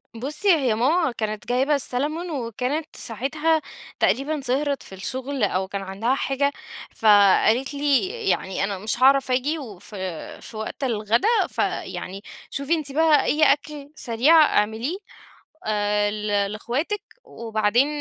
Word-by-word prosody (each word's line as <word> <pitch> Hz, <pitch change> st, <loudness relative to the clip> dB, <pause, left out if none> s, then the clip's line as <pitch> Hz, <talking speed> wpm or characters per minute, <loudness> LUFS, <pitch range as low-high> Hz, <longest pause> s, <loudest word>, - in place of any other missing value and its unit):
بُصّي، 295 Hz, -, -4 dB
هي 255 Hz, -7 st, +1 dB
ماما 285 Hz, +6 st, +2 dB
كانت 215 Hz, -1 st, -4 dB
جايبة 265 Hz, +4 st, +2 dB
السالمون 295 Hz, +6 st, -2 dB
وكانت 260 Hz, +4 st, -3 dB
ساعتها 300 Hz, +7 st, 0 dB, 0.4 s
تقريبًا 285 Hz, +2 st, +1 dB
سهرت 275 Hz, +2 st, -1 dB
في 190 Hz, -, -11 dB
الشغل 260 Hz, +5 st, -4 dB
أو 190 Hz, -1 st, 0 dB
كان 200 Hz, 0 st, -4 dB
عندها 200 Hz, +7 st, -1 dB
حاجة، 275 Hz, +1 st, 0 dB, 0.4 s
فقالت 220 Hz, +5 st, +4 dB
لي 285 Hz, +2 st, +2 dB, 0.2 s
يعني 190 Hz, 0 st, -1 dB
"أنا 200 Hz, 0 st, -2 dB
مش 215 Hz, +6 st, -3 dB
هاعرف 270 Hz, -1 st, +5 dB
آجي 285 Hz, +6 st, 0 dB
وف 210 Hz, -4 st, -10 dB, 0.5 s
في 220 Hz, -, -10 dB
وقت 220 Hz, +5 st, -5 dB
الغدا، 230 Hz, -, +1 dB, 0.2 s
فيعني 195 Hz, +2 st, -3 dB, 0.3 s
شوفي 280 Hz, +4 st, -1 dB
أنتِ 300 Hz, -4 st, -1 dB
بقى 315 Hz, 0 st, +4 dB
أي 310 Hz, +1 st, +1 dB
أكل 290 Hz, 0 st, -8 dB
سريع 285 Hz, +8 st, +4 dB, 0.2 s
اعمليه، 225 Hz, -, -2 dB, 0.7 s
آآ، 205 Hz, -1 st, +1 dB
ل 210 Hz, 0 st, -4 dB, 0.3 s
لاخواتك" 280 Hz, -, -2 dB, 0.2 s
وبعدين 225 Hz, +3 st, +1 dB
255 Hz, 130 wpm, -23 LUFS, 215-290 Hz, 0.7 s, هاعرف